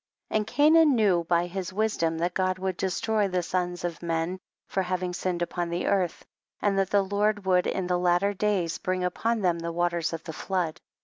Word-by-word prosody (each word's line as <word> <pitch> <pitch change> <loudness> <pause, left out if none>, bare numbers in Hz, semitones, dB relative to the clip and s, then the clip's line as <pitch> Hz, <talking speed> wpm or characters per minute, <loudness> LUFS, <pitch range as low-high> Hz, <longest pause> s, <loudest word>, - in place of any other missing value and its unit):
And 215 -1 0
Cainan 300 +2 +5
knew 190 -7 +3
by 170 +1 +2
his 180 0 -5
wis 215 +2 0
dom 165 -1 0
that 175 +2 -1
God 185 0 0
would 190 -1 -2
destroy 205 +3 0
the 180 -2 -1
sons 175 0 -2
of 175 -1 -4
men 170 +2 -2 0.3
for 190 - -1
having 180 -1 -2
sinned 175 -1 -2
upou 175 0 -2
earth, 185 -4 0 0.3
and 205 -1 +1
that 195 -1 +1
the 200 -1 +3
Lord 205 +1 0
would 180 -1 +3
in 190 - -1
the 180 0 0
lat 175 0 +3
ter 200 +1 +1
days 195 -5 0
bring 185 0 -1
upon 225 +5 0
them 175 -3 +1
the 170 0 -3
waters 170 -1 0
of 165 -1 -5
the 160 - -7
flood. 180 -2 -2
185 Hz, 205 wpm, -27 LUFS, 175-200 Hz, 0.3 s, Cainan